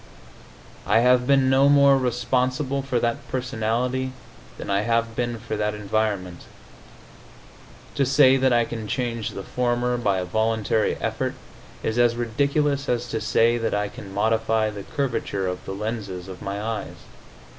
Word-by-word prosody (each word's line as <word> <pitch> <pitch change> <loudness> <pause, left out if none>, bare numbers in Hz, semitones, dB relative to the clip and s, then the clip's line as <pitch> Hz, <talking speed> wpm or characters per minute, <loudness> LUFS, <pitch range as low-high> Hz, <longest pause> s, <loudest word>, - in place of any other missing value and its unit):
I 115 - +4
have 125 0 +4
been 135 -1 +4
no 135 +1 +5
more 140 -1 +6
responsible 130 +2 0
for 130 -3 -1
that 120 0 -2
personality 125 +1 -1 0.4
than - - -7
I 100 0 +1
have 115 +1 0
been 120 -1 -2
for 110 0 -5
that 105 0 -1
environment. 105 -4 -2 1.5
To 140 - +1
say 135 0 +5
that 130 -1 +2
I 120 -1 +3
can 115 -2 -6
change 115 -2 -2
the 100 - -7
former 125 +1 0
by 100 -5 +1
a 90 - -2
voluntary 110 +2 0
effort - - -2 0.5
is 110 +2 -1
as 120 -1 +4
ridiculous 140 +4 0
as 120 0 0
to 110 - -2
say 115 +1 +2
that 115 -2 -1
I 105 0 -1
can 100 -1 -10
modify 110 +1 +1
the 100 -1 -7
curvature 115 -5 -2
of 90 0 -3
the 95 - -5
lenses 100 -4 -5
of 95 -1 -9
my 100 +1 -4
eyes. 110 +1 -4
115 Hz, 155 wpm, -24 LUFS, 105-130 Hz, 1.5 s, more